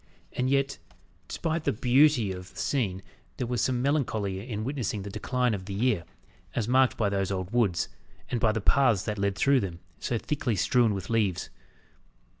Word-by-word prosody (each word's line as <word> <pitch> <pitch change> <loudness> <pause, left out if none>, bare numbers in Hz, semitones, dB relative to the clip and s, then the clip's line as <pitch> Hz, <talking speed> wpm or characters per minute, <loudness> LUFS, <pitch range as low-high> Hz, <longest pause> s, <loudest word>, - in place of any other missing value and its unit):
And 130 +1 0
yet, 140 0 +1 0.5
despite 165 -1 -2
the - - +2
beauty 125 -1 +4
of 90 0 -7
the - - -18
scene, 95 -9 -1 0.3
there 125 - -1
was 120 0 -1
something 125 -1 +1
melancholy 110 -7 -1
in 110 -2 -3
witnessing 120 -6 -2
the 100 - -6
decline 125 +2 0
of 95 -3 -4
the 100 0 -5
year, 110 -5 +1 0.5
as 115 -3 0
marked 130 +1 +3
by 105 - +2
those 100 -1 0
old 95 -1 -3
woods, 105 -9 +2 0.4
and 120 - -1
by 110 -1 +3
the 110 0 -2
paths 115 -3 +3
that 105 -1 -3
led 100 0 0
through 140 +5 +4
them, 90 -6 -4 0.2
so 120 - -1
thickly 130 -2 -1
strewn 115 +1 +3
with 95 +3 -5
leaves. 105 -6 0
115 Hz, 185 wpm, -28 LUFS, 100-130 Hz, 0.5 s, beauty